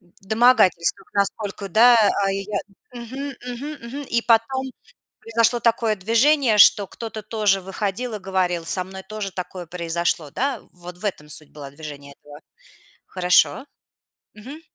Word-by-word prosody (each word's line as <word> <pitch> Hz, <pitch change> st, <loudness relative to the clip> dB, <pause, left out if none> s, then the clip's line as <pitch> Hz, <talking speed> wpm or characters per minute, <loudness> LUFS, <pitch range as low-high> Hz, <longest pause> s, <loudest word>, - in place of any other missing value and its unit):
В 175 Hz, +2 st, -21 dB
домогательствах 220 Hz, -7 st, +3 dB
насколько, 200 Hz, 0 st, -2 dB
да, 235 Hz, +6 st, +6 dB, 0.3 s
а, 195 Hz, -, +1 dB
и 195 Hz, 0 st, -3 dB
я 200 Hz, -2 st, -1 dB, 0.4 s
Мгм, 260 Hz, +4 st, -6 dB
мгм, 255 Hz, +5 st, -5 dB
мгм. 280 Hz, +4 st, -6 dB
И 235 Hz, 0 st, +1 dB
потом 245 Hz, +3 st, +2 dB, 0.5 s
произошло 230 Hz, +1 st, +1 dB
такое 230 Hz, -2 st, +1 dB
движение, 230 Hz, +4 st, +3 dB
что 205 Hz, -1 st, +7 dB
кто-то 220 Hz, +1 st, -8 dB
тоже 210 Hz, -3 st, +1 dB
выходил 205 Hz, +5 st, -4 dB
и 210 Hz, -, -4 dB
говорил: 180 Hz, -3 st, -1 dB
"Со 185 Hz, +1 st, +1 dB
мной 190 Hz, +1 st, -9 dB
тоже 210 Hz, -1 st, -6 dB
такое 180 Hz, -1 st, -6 dB
произошло, 170 Hz, -2 st, -2 dB
да?". 265 Hz, -, -2 dB
Вот 175 Hz, 0 st, -11 dB
в 210 Hz, -, -8 dB
этом 150 Hz, -7 st, -4 dB
суть 150 Hz, -1 st, -5 dB
была 140 Hz, -2 st, -10 dB
движения 140 Hz, -1 st, -10 dB
этого. 145 Hz, 0 st, -14 dB, 0.7 s
Хорошо. 185 Hz, +7 st, +2 dB, 0.7 s
Мгм. 260 Hz, +9 st, -10 dB
205 Hz, 145 wpm, -22 LUFS, 180-235 Hz, 0.7 s, что